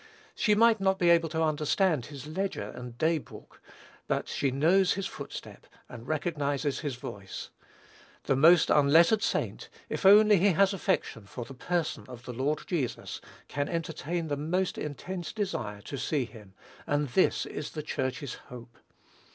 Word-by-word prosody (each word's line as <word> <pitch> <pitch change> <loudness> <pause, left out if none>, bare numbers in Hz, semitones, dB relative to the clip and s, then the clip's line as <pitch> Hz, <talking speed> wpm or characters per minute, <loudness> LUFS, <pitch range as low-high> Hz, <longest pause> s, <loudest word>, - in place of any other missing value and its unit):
She 210 - +2
might 225 0 +5
not 190 0 +2
be 175 -2 +4
able 165 -1 +4
to 160 0 0
understand 155 - +1
his 140 -3 -9
ledger 190 +6 -3
and 125 -1 -9
day 160 +2 +2
book; - - -14 0.5
but - - -1
she 140 - 0
knows 170 +8 +3
his 195 0 -3
footstep - - -8 0.2
and 120 0 -10
recognizes 145 -2 -1
his 145 -5 -3
voice. 100 -5 -8 0.7
The 135 - +1
most 165 +5 +6
unlettered 165 +9 +5
saint, - - -2 0.2
if - - -3
only 210 +1 +7
he 190 +2 +4
has 195 +4 +4
affection 175 - -1
for 120 +3 -7
the 135 - -10
person 170 +5 -2
of 125 -2 -11
the 125 - -6
Lord 140 +5 -1
Jesus, 150 -9 -3 0.3
can 145 0 -2
entertain 165 0 -3
the 145 -2 -2
most 180 +6 -1
intense 170 +4 -5
desire 120 - -3
to 140 +5 -6
see 140 0 0
him; 105 -5 -14 0.3
and 145 -1 0
this 185 - +2
is 150 - -5
the 155 - -4
Church's 130 -1 -3 0.2
hope. 120 -1 -11
155 Hz, 160 wpm, -29 LUFS, 130-180 Hz, 0.7 s, only